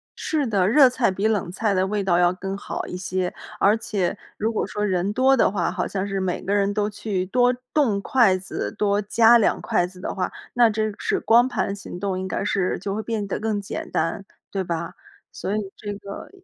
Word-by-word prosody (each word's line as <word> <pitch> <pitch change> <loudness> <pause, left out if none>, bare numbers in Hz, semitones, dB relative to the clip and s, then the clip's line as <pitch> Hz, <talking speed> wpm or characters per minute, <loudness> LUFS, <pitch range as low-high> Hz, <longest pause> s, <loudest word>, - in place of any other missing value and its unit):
是 305 -3 -1
的， 195 -5 +2
热 265 +4 +7
菜 250 -2 +1
比 195 +3 0
冷 205 -5 0
菜 210 +2 0
的 185 0 +2
味 205 0 -1
道 180 -3 +2
要 175 0 +4
更 195 +1 -5
好 - - -5
一 - - -6
些， 180 0 -2 0.3
而 210 +3 +4
且 200 -4 -2 0.2
如 220 +2 0
果 220 - -1
说 210 0 -2
人 190 0 0
多 260 +3 +4
的 - - +4
话， 180 -4 0
好 180 -1 -2
像 195 0 -3
是 195 -1 -2
每 185 -2 -2
个 200 - -2
人 200 0 +2
都 210 0 0
去 205 -3 -3
多 245 +5 +3 0.2
动 235 -10 +2
筷 210 -5 +4
子， 180 - -5
多 205 0 +2
夹 225 +3 +5
两 225 - +1
筷 175 - +1
子 180 0 -15
的 - - -3
话， 185 -2 -2 0.2
那 240 -1 +5
真 215 0 -1
是 - - 0
光 235 +2 +5
盘 200 -5 -2
行 190 -2 -8
动 190 -1 -2
应 190 - -3
该 190 - -2
是 195 -2 0
就 195 +2 -3
会 215 - -2
变 220 -2 -3
得 - - -3
更 215 -2 -1
简 200 - -6
单， 165 +4 -1 0.3
对 195 -1 -1
吧？ 170 -1 -4 0.4
所 200 - -3
以 - - 0 0.2
这 205 -1 -5
个， 200 0 -9
200 Hz, 240 characters per minute, -23 LUFS, 185-220 Hz, 0.4 s, 热